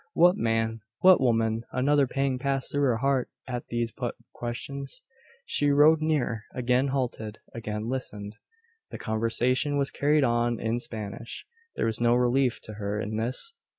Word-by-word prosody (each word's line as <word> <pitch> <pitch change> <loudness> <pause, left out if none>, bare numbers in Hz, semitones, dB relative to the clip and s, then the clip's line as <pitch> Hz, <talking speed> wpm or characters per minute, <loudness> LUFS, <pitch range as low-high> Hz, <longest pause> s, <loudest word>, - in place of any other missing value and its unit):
What 175 +2 +6
man? 115 0 0 0.2
What 185 -4 +7
woman? 115 -2 +2
Another 140 +2 +3
pang 135 0 -1
passed 135 0 -1
through 145 - 0
her 120 -4 +2
heart 135 0 +1 0.2
at 125 -2 -4
these 120 -1 -2
put 120 +1 -4 0.2
questions. 140 - -5 0.4
She 145 - +2
rode 150 +2 +6
nearer; 135 -8 0
again 125 +2 +2
halted; 120 -5 -2 0.2
again 105 -2 -4
listened. 110 -4 -4 0.5
The - - -7
conversation 120 +6 +1
was 140 -1 +1
carried 150 +1 +2
on 120 -1 +1
in 115 +1 -1
Spanish. 110 -1 -7 0.3
There - - 0
was 115 +1 -1
no 120 0 +4
relief 125 +1 +2
to 110 - -8
her 100 +1 -2
in 110 0 -3
this. 125 - -2
120 Hz, 155 wpm, -27 LUFS, 115-140 Hz, 0.5 s, What